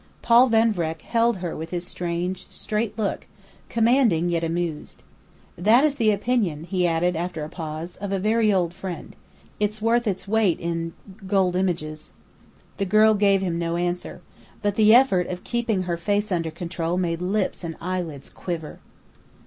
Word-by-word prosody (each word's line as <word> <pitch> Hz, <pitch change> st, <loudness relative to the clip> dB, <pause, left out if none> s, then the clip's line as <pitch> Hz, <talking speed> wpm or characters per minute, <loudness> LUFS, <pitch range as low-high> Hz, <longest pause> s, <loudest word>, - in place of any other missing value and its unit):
'" -, -, -33 dB
Paul 240 Hz, +2 st, +6 dB
Van 225 Hz, 0 st, +4 dB
Vreck 165 Hz, -3 st, -3 dB
held 230 Hz, -2 st, +2 dB
her 175 Hz, -2 st, -4 dB
with 160 Hz, +1 st, -6 dB
his 175 Hz, -1 st, -4 dB
strange, 175 Hz, +1 st, -3 dB
straight 215 Hz, 0 st, -3 dB
look, 210 Hz, -3 st, -2 dB, 0.4 s
commanding, 225 Hz, -8 st, +3 dB
yet 170 Hz, -1 st, 0 dB
amused. 165 Hz, -2 st, -3 dB, 0.5 s
"That 220 Hz, +9 st, +4 dB
is 295 Hz, -2 st, +2 dB
the 225 Hz, -4 st, +3 dB
opinion," 205 Hz, -7 st, 0 dB
he 180 Hz, 0 st, 0 dB
added 170 Hz, +1 st, +1 dB
after 165 Hz, -1 st, -3 dB
a 150 Hz, -, -6 dB
pause, 160 Hz, 0 st, -6 dB
"of 200 Hz, 0 st, -5 dB
a 195 Hz, -, +1 dB
very 215 Hz, +2 st, +2 dB
old 175 Hz, -3 st, +1 dB
friend. 185 Hz, -1 st, -7 dB, 0.4 s
It's 210 Hz, +1 st, 0 dB
worth 230 Hz, +2 st, +2 dB
its 195 Hz, 0 st, -2 dB
weight 210 Hz, -5 st, +2 dB
in 165 Hz, -1 st, -3 dB, 0.3 s
gold 190 Hz, -2 st, +2 dB
images." 155 Hz, -5 st, -2 dB, 0.6 s
The 195 Hz, -, 0 dB
girl 215 Hz, +3 st, +5 dB
gave 200 Hz, -2 st, +3 dB
him 170 Hz, -2 st, -1 dB
no 170 Hz, 0 st, -1 dB
answer. 175 Hz, 0 st, -3 dB, 0.4 s
But 205 Hz, 0 st, +1 dB
the 215 Hz, +1 st, +5 dB
effort 220 Hz, -9 st, +4 dB
of 180 Hz, 0 st, -6 dB
keeping 230 Hz, -5 st, -1 dB
her 175 Hz, -1 st, -2 dB
face 205 Hz, +4 st, -1 dB
under 165 Hz, -3 st, 0 dB
control 170 Hz, +1 st, -3 dB
made 170 Hz, -2 st, -1 dB
lips 190 Hz, +1 st, -1 dB
and 165 Hz, -1 st, -4 dB
eyelids 170 Hz, -6 st, -4 dB
quiver. 165 Hz, -4 st, -6 dB
185 Hz, 170 wpm, -24 LUFS, 170-215 Hz, 0.6 s, Paul